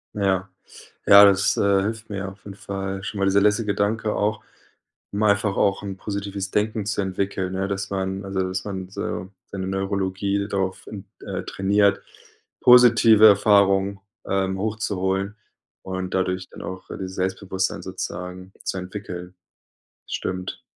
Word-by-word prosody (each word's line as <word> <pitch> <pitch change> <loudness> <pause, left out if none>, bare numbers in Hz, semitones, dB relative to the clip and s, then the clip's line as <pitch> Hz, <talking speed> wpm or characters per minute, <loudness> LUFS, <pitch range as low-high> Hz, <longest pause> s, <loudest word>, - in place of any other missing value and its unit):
Ja. 95 -2 0 0.6
Ja, 100 0 +10
das, 100 0 +3
äh, 100 -1 +3
hilft 110 +2 -4
mir 100 -2 -4
auf 95 +1 -16
jeden 100 -1 -8
Fall 95 -1 -5
schon 100 0 -5
mal, 100 - +2
dieser 100 +1 +4
letzte 105 +2 +2
Gedanke 105 +1 0
auch, 105 +1 -1 0.7
um 100 - -3
einfach 100 -1 +2
auch 100 0 +1
'n 100 -1 -5
positives 100 -1 -4
Denken 105 0 0
zu 105 0 -1
entwickeln. 95 -1 -2
Ja, 95 +1 -1
dass 100 0 -3
man 95 0 -3
also 95 -1 -2
dass 95 0 -4
man 95 -3 -5
so 95 -1 -4 0.2
seine 95 -1 -5
Neurologie 95 +1 -1
darauf, 95 -2 -3
ähm, 100 -2 -8 0.2
äh, - - -5
trainiert, 100 +1 +2 0.6
positive 115 -3 +7
Erfahrung, 100 -1 +4 0.3
ähm, 95 0 0
hochzuholen 100 -2 -1 0.5
und 95 -1 -4
dadurch 95 0 -1
dann - - -11
auch 95 0 -7
dieses 95 -1 -6
Selbstbewusstsein 95 0 -2
sozusagen 90 0 -6
zu - - -2
entwickeln. 90 -1 -7 0.7
Stimmt. 90 0 -4
100 Hz, 145 wpm, -23 LUFS, 95-100 Hz, 0.7 s, Ja